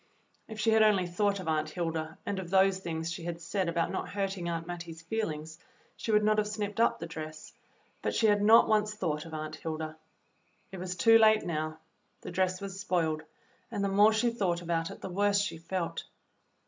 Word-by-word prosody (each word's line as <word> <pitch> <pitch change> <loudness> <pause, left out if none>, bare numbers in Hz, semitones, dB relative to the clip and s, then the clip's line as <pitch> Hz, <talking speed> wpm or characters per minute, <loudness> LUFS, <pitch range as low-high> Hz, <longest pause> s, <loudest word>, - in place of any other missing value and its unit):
If 220 -1 -8
she 225 +1 +3
had 220 0 +5
only 205 -4 +4
thought 200 +3 0
of 185 - -7
Aunt 155 -1 0
Hilda 160 -2 -3
and 200 -1 -2
of 180 -2 -6
those 190 0 +4
things 165 -2 -4
she 165 0 -6
had 170 -1 -4
said 180 +1 -1
about 170 0 0
not - - -3
hurting 195 -3 -2
Aunt 165 -1 -3
Mattie's 170 -2 -7
feelings, 160 -5 -4 0.4
she 225 - -3
would 210 0 +4
not 215 0 +3
have 210 - +1
snipped 210 0 -4
up 230 - +3
the 170 - -6
dress, 155 -1 -8 0.5
but - - -1
she 225 - +2
had 205 -1 +4
not 220 +3 +7
once 215 -1 +2
thought 160 -7 -2
of 160 - -7
Aunt 155 0 -5
Hilda. 155 -1 -4 0.8
It 190 - -7
was 180 0 -4
too 225 +6 +6
late 220 -1 +5
now. 155 -1 -2 0.4
The - - -7
dress 185 +1 0
was 195 -1 -6
spoiled, 165 -5 0 0.5
and 200 - -2
the 200 - +1
more 205 +2 +6
she 225 +2 +2
thought 180 -6 -1
about 165 -1 -1
it - - -10
the - - -5
worse 200 +2 +2
she 200 -5 -2
felt. 170 +1 -3
180 Hz, 210 wpm, -30 LUFS, 165-205 Hz, 0.8 s, not